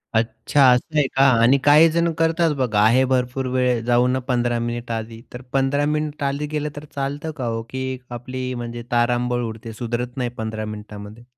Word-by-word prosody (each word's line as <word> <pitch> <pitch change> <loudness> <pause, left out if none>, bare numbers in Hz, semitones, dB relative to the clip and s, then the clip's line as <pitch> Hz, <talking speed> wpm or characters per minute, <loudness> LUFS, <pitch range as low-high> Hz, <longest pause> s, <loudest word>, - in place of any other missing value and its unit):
अच्छा 115 +5 +1
असं 150 +5 -2
आहे 145 -2 +3
का? 135 - +4 0.2
आणि 125 +4 +5
काही 150 +3 +7
जण 170 +1 +1
करतात 165 0 +2
बघा, 120 -6 +1
आहे 115 +5 +5
भरपूर 130 0 -1
वेळ 125 -2 +2
जाऊ 120 +1 +3
ना, 130 +1 +1
15 120 -2 0
मिनिटं 120 0 -3
आधी. 115 0 -6
तर 125 - -7
15 135 +1 +1
मिनिटं 150 -1 -2
आधी 140 +2 -1
गेलं, 150 0 -3
तर 145 +1 -8
चालतं 145 +3 -3
का 130 - -3
हो? 115 -1 -2
की 130 0 -4
आपली 125 +1 -5
म्हणजे 120 0 -6
तारांबळ 120 +1 +1
उडते, 115 0 -6
सुधारत 120 +2 -4
नाही 125 -2 -1
15 110 -1 -4
मिनिटामध्ये? 105 +1 -9
125 Hz, 185 wpm, -22 LUFS, 120-140 Hz, 0.2 s, काही